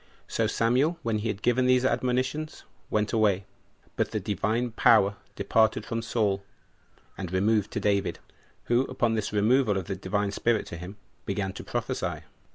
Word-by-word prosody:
2. - - -11
So - - +2
Samuel, 130 +9 +2
when 110 -2 0
he 110 - -2
had 105 -2 -3
given 125 +1 +3
him - - +3
these 130 0 +4
admonitions, 130 +5 -1 0.3
went 105 +1 0
away. 100 -4 +2 0.5
But - - 0
the - - -2
Divine 115 +4 -1
Power 105 -3 +4 0.2
departed 110 -1 +2
from 115 0 -2
Saul, 105 -4 0 0.8
and 90 -3 -4
removed 105 +2 +2
to - - -1
David; 100 -1 +1 0.5
who, 120 +1 +2
upon 120 -3 0
this 110 -3 -1
removal 105 +1 +3
of 95 - -3
the 95 - -3
Divine 100 +2 -1
Spirit 115 +2 +1
to 85 - -6
him, 90 +4 -9 0.3
began 95 -1 -2
to - - -8
prophesy. - - -3
110 Hz, 170 wpm, -27 LUFS, 100-120 Hz, 0.8 s, these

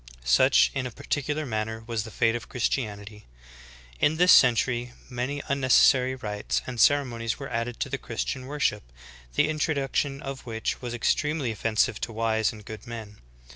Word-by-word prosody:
Such - - +5
in 135 -2 -2
a - - -6
particular 145 +3 -3
manner 110 -2 -3
was 115 -2 -2
the - - -8
fate 115 +1 +1
of 120 - -6
Christianity. 105 -4 -3 0.7
In 155 +2 +2
this 180 +2 +6
century 120 0 +4 0.2
many 130 +4 -3
unnecessary 130 -1 +4
rites 105 -5 -3
and 125 -2 -6
ceremonies 120 -5 +2
were 135 -2 -7
added 115 +1 -3
to 140 - -1
the 140 0 -3
Christian 125 +3 -4
worship, 140 -7 0 0.5
the - - +3
in 155 0 -3
troduction 140 -2 0
of 135 -2 -7
which 110 +2 -3
was 120 -1 -4
extremely 150 +2 0
offensive 110 0 0
to - - -3
wise 110 -1 +1
and 105 -2 -12
good 110 +1 -9
men. 110 -3 -8
120 Hz, 165 wpm, -26 LUFS, 110-135 Hz, 0.7 s, this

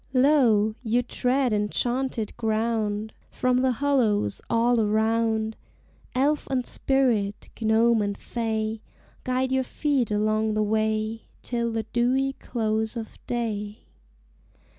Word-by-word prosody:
Lo! 250 -6 +4
you 240 +1 +1
tread 250 0 0
enchanted 235 +2 -1
ground! 220 -1 -1 0.2
From 255 0 +1
the 255 0 +2
hollows 230 - +1
all 235 +1 +3
around 220 +1 +1 0.6
Elf 290 +3 +1
and 255 -2 0
spirit, 235 -7 0
gnome 225 +1 +3
and 205 -1 -2
fay, 220 -2 -3 0.4
Guide 255 +1 0
your 265 0 +2
feet 270 -1 0
along 215 +1 +1
the 215 - +2
way 215 +1 -1 0.2
Till 235 -1 -1
the 225 0 -2
dewy 260 +3 +2
close 220 0 -1
of 225 -1 -7
day. 215 -3 -3
225 Hz, 115 wpm, -25 LUFS, 215-255 Hz, 0.6 s, Lo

